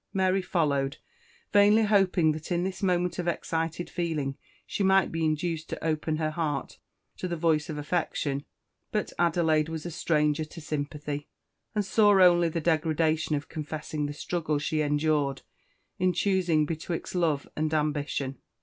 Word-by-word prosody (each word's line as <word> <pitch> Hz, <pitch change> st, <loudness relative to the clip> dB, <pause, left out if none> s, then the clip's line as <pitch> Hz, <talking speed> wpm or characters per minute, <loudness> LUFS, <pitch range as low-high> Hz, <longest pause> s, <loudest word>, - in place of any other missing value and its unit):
Mary 190 Hz, -1 st, +2 dB
followed, 140 Hz, -6 st, 0 dB, 0.6 s
vainly 205 Hz, +2 st, +6 dB
hoping 195 Hz, -6 st, +3 dB
that 155 Hz, +3 st, -6 dB
in 175 Hz, 0 st, +1 dB
this 185 Hz, 0 st, -4 dB
moment 180 Hz, -2 st, +1 dB
of 175 Hz, -, -2 dB
excited 165 Hz, 0 st, -2 dB
feeling 155 Hz, -6 st, -2 dB, 0.3 s
she -, -, -4 dB
might 190 Hz, -1 st, +4 dB
be 165 Hz, 0 st, -2 dB
induced 160 Hz, +1 st, -1 dB
to -, -, -5 dB
open 155 Hz, 0 st, 0 dB
her 155 Hz, 0 st, -1 dB
heart 155 Hz, -3 st, -3 dB, 0.4 s
to 185 Hz, -, -4 dB
the 175 Hz, -1 st, -3 dB
voice 160 Hz, -2 st, +1 dB
of 155 Hz, -, -4 dB
affection; 145 Hz, -2 st, -1 dB, 0.5 s
but 210 Hz, -2 st, -2 dB
Adelaide 160 Hz, -2 st, +2 dB
was 160 Hz, 0 st, -5 dB
a 175 Hz, -, -4 dB
stranger 150 Hz, -1 st, +1 dB
to 155 Hz, +2 st, -10 dB
sympathy, 145 Hz, -1 st, -4 dB, 0.5 s
and 210 Hz, -1 st, +1 dB
saw 205 Hz, -1 st, +5 dB
only 175 Hz, -2 st, +6 dB
the 165 Hz, -, -2 dB
degradation 160 Hz, -1 st, +1 dB
of 145 Hz, 0 st, -4 dB
confessing 150 Hz, -1 st, -4 dB
the 145 Hz, -, -5 dB
struggle 155 Hz, 0 st, -2 dB
she 155 Hz, +1 st, -1 dB
endured 145 Hz, -2 st, +1 dB, 0.6 s
in 185 Hz, 0 st, +2 dB
choosing 180 Hz, -4 st, +2 dB
betwixt 165 Hz, +2 st, -4 dB
love 160 Hz, -6 st, 0 dB
and 155 Hz, 0 st, -1 dB
ambition. 145 Hz, -3 st, -1 dB
160 Hz, 155 wpm, -28 LUFS, 150-175 Hz, 0.6 s, vainly